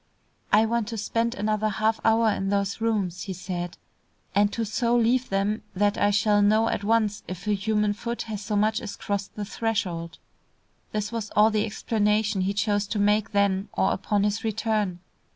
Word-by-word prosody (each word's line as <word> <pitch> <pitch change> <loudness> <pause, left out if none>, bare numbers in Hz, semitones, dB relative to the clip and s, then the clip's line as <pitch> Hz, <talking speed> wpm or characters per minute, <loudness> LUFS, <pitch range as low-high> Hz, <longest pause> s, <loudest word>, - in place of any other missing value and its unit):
"I 215 +2 +5
want 230 -1 0
to 230 0 -5
spend 230 +3 -1
another 215 +1 0
half 215 +2 0
hour 225 0 +4
in 195 -1 -2
those 200 +1 -1
rooms," 200 -6 0
he 195 - -4
said, 175 -1 -5 0.6
"and 205 +1 +3
to 230 +1 -2
so 235 +3 0
leave 240 +2 +2
them 200 +2 0
that 205 +2 +2
I 205 - +2
shall 205 +1 +3
know 215 +2 +4
at - - -2
once 215 -1 +1
if 185 +1 -7
a 210 - +1
human 210 +1 +1
foot 235 +3 -4
has 215 -2 -5
so 210 +1 -3
much 215 +2 +2
as 210 - -6
crossed 200 -1 -4
the 210 - -4
threshold." 185 -7 -2 0.7
This 210 0 -2
was 225 -3 -4
all 215 +1 +6
the 215 0 +1
explanation 210 -1 0
he 190 +2 0
chose 205 0 +1
to 215 - -3
make 210 +1 +2
then 200 -1 +1
or 190 - +2
upon 205 +1 0
his 210 +1 0
return. 215 -4 -1
210 Hz, 190 wpm, -25 LUFS, 200-220 Hz, 0.7 s, all